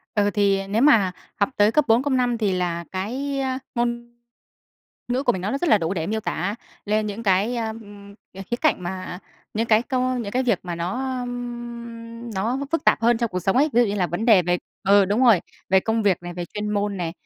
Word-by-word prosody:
Ừ, 205 -1 +3
thì 195 -1 +2
nếu 210 +4 0
mà 220 -11 +5 0.2
học 200 - +2
tới 205 +1 +4
cấp 300 +2 +3
4, 225 +3 +4
cấp 285 0 -1
5 245 -2 +1
thì 210 -4 +1
là 175 -2 -1
cái, 260 +9 -3
a, 260 -1 -1 0.2
ngôn 235 -1 -2 0.9
ngữ 250 +2 0
của 245 - +3
mình 185 - -4
nó 195 +3 -2
nó 275 - -1
rất 345 - 0
là 215 - +6
đủ 165 +2 -2
để 165 -3 -2
miêu 220 +3 -1
tả 200 0 -2 0.3
lên 215 +1 0
những 210 +2 -5
cái, 205 +4 +2
a, 225 -1 -1
ừm, 205 -2 -10 0.2
ờ, 195 - -7
khía 240 - +1
cạnh 285 -8 +1
mà 185 0 -5 0.4
những 225 +2 0
cái 220 0 +4
co 255 0 -1
những 220 -5 -4
cái 255 - +1
việc 235 -7 +1
mà 175 -1 -4
nó, 250 +10 -3
ừm, 235 -1 -7
nó 225 +7 -1
phức 330 - 0
tạp - - +4
hơn 235 0 +4
trong 235 -2 -1
cuộc 180 - -2
sống 190 +4 +1
ấy. 290 +4 +4
Ví 240 - +4
dụ - - +2
như 200 - -1
là 190 -3 +1
vấn 175 +6 -3
đề 215 -6 +6
về 175 +1 +1 0.3
ừ, 200 0 +6
đúng 210 +7 +1
rồi, 225 -8 +6 0.3
về 190 +1 +5
công 225 +3 0
việc 200 -4 +3
này, 175 0 -7
về 175 0 -4
chuyên 210 0 -3
môn 205 -1 -1
này, 170 -3 -3
215 Hz, 245 wpm, -23 LUFS, 195-240 Hz, 0.9 s, là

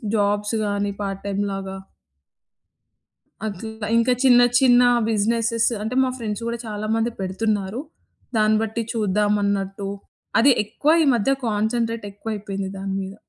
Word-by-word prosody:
Jobs 205 +1 +1
గాని 205 0 -1
part 195 -1 -3
time 200 0 -1
లాగ 195 0 -4 1.8
అట్లా 220 +1 -6
ఇంకా 230 +2 +3
చిన్న 245 -2 +7 0.2
చిన్న 250 -2 +6 0.3
బిజినెసస్ 230 +2 +1
అంటే 220 +4 -3
మా 260 - 0
ఫ్రెండ్స్ 215 -2 -4
కూడా 235 0 -3
చాలా 210 0 -4
మంది 225 +1 0
పెడుతున్నారు. 195 +3 -1 0.6
దాన్ని 215 0 +4
బట్టి 225 +1 -2
చూద్దాం 210 -2 +1
అన్నట్టు 195 0 -2 0.5
అది 270 +5 +6
ఎక్కువ 235 +8 0
ఈ - - +3
మధ్య 235 +3 +1 0.2
కాన్సంట్రేట్ 225 +1 -1
ఎక్కువైయిపోయింది 200 -2 -5
దాని 195 0 -3
మీద. 190 0 -6
210 Hz, 130 wpm, -22 LUFS, 200-230 Hz, 1.8 s, చిన్న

